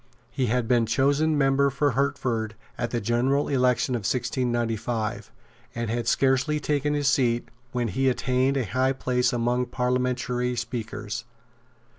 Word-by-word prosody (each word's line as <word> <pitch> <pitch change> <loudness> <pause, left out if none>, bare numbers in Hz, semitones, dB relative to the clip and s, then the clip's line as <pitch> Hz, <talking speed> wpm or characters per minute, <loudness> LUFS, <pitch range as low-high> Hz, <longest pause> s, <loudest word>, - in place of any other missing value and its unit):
He 130 0 -1
had 120 0 0
been 120 -2 +3
chosen 145 +5 +2
member 140 0 +3
for 140 +2 +1
Hertford 125 -4 -1 0.2
at 120 0 -2
the 120 - -1
general 120 +6 +1
election 125 -1 +2
of 120 - 0
1695, 120 -1 -2 0.4
and 115 -2 -2
had 120 0 -2
scarcely 135 +4 +2
taken 145 0 0
his 145 -1 0
seat 120 -4 +2 0.2
when 120 -2 -1
he 135 +7 +1
attained 130 +2 +1
a 130 - +1
high 130 +6 +1
place 125 -1 0
among 120 +1 0
parliamentary 125 0 -1
speakers. 120 -1 -4
125 Hz, 140 wpm, -25 LUFS, 120-135 Hz, 0.4 s, been